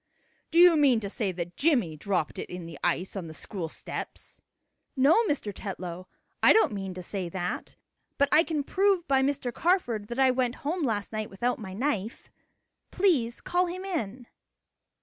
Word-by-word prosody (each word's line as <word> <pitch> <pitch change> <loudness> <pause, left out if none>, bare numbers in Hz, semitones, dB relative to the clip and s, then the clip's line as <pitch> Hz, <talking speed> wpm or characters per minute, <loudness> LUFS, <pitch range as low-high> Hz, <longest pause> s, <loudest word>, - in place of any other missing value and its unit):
Do 335 - -1
you 350 -1 +8
mean 275 -6 +4
to 200 -2 -5
say 210 -4 -1
that 175 -1 -6
Jimmie 245 - +2
dropped 180 0 -2
it - - -6
in 180 -1 -7
the 165 -4 -9
ice 185 +4 0
on 185 -4 -4
the 160 - -9
school 175 -4 -5
steps?" - - -7 0.5
"No, 290 - +5
Mr. 240 - -1
Tetlow, 185 -2 -6 0.3
I - - +7
don't 440 - +4
mean 195 -2 -5
to 180 - -6
say 185 -1 -4
that. 180 0 -4 0.4
But 280 - +4
I 315 - +6
can 310 -4 -2
prove 385 +2 +1
by 270 -1 +3
Mr. 265 -3 -1
Carford 245 - +1
that 240 - -6
I 265 -1 +5
went 250 -1 0
home 340 +5 -1
last 220 -7 -1
night 215 0 -3
without 240 +6 -1
my 190 -4 -7
knife. 230 -3 -3 0.6
Please 285 -12 +1
call 360 +1 +1
him 370 +2 -5
in." 255 - -4
235 Hz, 180 wpm, -28 LUFS, 190-300 Hz, 0.6 s, you